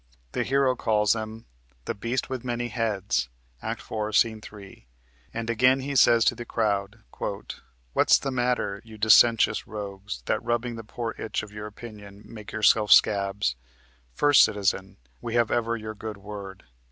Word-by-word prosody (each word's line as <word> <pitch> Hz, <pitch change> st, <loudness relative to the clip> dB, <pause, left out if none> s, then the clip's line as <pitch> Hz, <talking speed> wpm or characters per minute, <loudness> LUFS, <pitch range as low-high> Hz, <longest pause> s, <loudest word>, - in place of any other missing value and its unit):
The -, -, -1 dB
hero 135 Hz, -1 st, +2 dB
calls 105 Hz, -3 st, +2 dB
them 110 Hz, 0 st, -6 dB, 0.4 s
the -, -, -2 dB
"beast 120 Hz, +5 st, -3 dB
with 130 Hz, -2 st, -5 dB
many 120 Hz, -1 st, -3 dB
heads" 100 Hz, -, -1 dB, 0.3 s
(Act -, -, -4 dB
4, 110 Hz, -1 st, -3 dB
Sc. 105 Hz, -, +5 dB, 0.2 s
3), 100 Hz, -, -13 dB, 0.4 s
and 115 Hz, 0 st, -5 dB
again 125 Hz, +3 st, +3 dB
he 140 Hz, +1 st, -4 dB
says 115 Hz, -2 st, +5 dB
to -, -, +4 dB
the 120 Hz, -, -7 dB
crowd: 105 Hz, -4 st, -2 dB, 0.9 s
"What's -, -, +5 dB
the 135 Hz, -, -4 dB
matter, 120 Hz, -5 st, -1 dB
you 110 Hz, -1 st, -13 dB
dissentious 110 Hz, 0 st, +5 dB
rogues, 100 Hz, -, -7 dB
That -, -, 0 dB
rubbing 120 Hz, 0 st, -1 dB
the 115 Hz, -, -8 dB
poor 115 Hz, +1 st, -5 dB
itch 110 Hz, -, -3 dB
of 105 Hz, -, -10 dB
your 105 Hz, 0 st, -7 dB
opinion 105 Hz, -2 st, -11 dB
Make 105 Hz, -2 st, -10 dB
yourself 110 Hz, -1 st, +3 dB
scabs? 100 Hz, -, +4 dB, 0.6 s
First 145 Hz, -, +5 dB
Citizen. 95 Hz, -1 st, -1 dB, 0.2 s
We 115 Hz, -, -4 dB
have 120 Hz, -2 st, +2 dB
ever 115 Hz, 0 st, 0 dB
your 110 Hz, -1 st, -6 dB
good 110 Hz, -1 st, -7 dB
word. 100 Hz, -1 st, -9 dB
110 Hz, 160 wpm, -26 LUFS, 105-120 Hz, 0.9 s, Sc